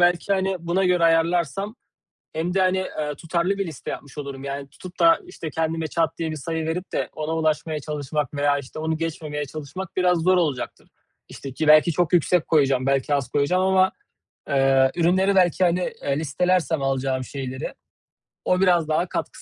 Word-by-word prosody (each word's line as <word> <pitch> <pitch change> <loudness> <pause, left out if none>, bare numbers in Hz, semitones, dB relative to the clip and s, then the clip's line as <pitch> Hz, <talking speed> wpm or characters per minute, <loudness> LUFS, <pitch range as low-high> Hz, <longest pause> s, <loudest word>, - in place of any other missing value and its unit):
belki, 175 +2 +3
hani, 190 -1 0
buna 170 +3 0
göre 180 -2 +3
ayarlarsam 170 - +1 0.6
hem 170 +3 -2
de 195 - +2
hani, 185 0 +2 0.2
ııı, 150 -1 -2
tutarlı 170 +5 -1
bir 195 - -1
liste 155 -6 -7
yapmış 145 +1 -8
olurum. 140 -1 -6
Yani, 140 0 -5
tutup 180 +5 -12
da 330 0 +6
işte, 170 - -7
kendime 160 +1 -1
çat 160 +1 -1
diye 165 -1 -2
bir 155 - -4
sayı 160 +2 -3
verip 175 +3 -4
de - - -1
ona 155 +1 -3
ulaşmaya 155 -1 0
çalışmak 150 -1 -3
veya 145 0 +2
işte, 140 +2 -9
onu 160 +1 -1
geçmemeye 155 -2 -4
çalışmak 155 +6 -8
biraz 180 -2 +3
zor 185 +3 +3
olacaktır. 150 -8 -2 0.4
İşte, 135 - -8
ki 155 +4 -2
belki 155 +2 +6
çok 175 +2 0
yüksek 175 0 +2
koyacağım, 135 -4 +2
belki 135 +1 +1
az 140 -4 -1
koyacağım 175 +6 +1
ama, 190 0 +3 0.6
ııı, 135 -1 +4
ürünleri 185 +3 +2
belki, 185 -1 +3
hani, 180 +1 +1
ııı, 140 - 0
listelersem 160 +1 0
alacağım 135 -1 -1
şeyleri 130 0 -6 0.7
o 180 +1 +2
biraz 175 -4 +3
daha 155 +3 +1
katkı - - -4
160 Hz, 180 wpm, -23 LUFS, 145-180 Hz, 0.7 s, da